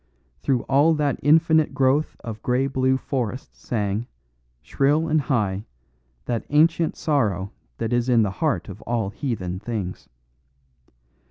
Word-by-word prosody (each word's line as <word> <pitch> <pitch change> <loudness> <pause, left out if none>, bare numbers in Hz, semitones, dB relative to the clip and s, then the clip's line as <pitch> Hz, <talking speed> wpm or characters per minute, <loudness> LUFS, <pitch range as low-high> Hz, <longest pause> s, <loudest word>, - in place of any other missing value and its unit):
Through 120 - 0
all 145 +4 +3
that 145 -2 0
infinite 160 -1 +4
growth 135 +2 +2
of 110 -2 -7
grey 125 +2 +1
blue 130 -1 +1
forests 130 -2 -4
sang, 105 0 -2 0.6
shrill 150 +4 +1
and 155 -1 +2
high, 105 -8 -1 0.6
that 120 -2 -2
ancient 165 +2 +3
sorrow 105 - 0 0.3
that 115 +1 -2
is 120 +1 +1
in 120 -3 +5
the 100 - -1
heart 155 -3 0
of 100 0 -9
all 115 -4 -2
heathen 95 -9 -3
things. 105 -4 -5
130 Hz, 135 wpm, -23 LUFS, 110-145 Hz, 0.6 s, in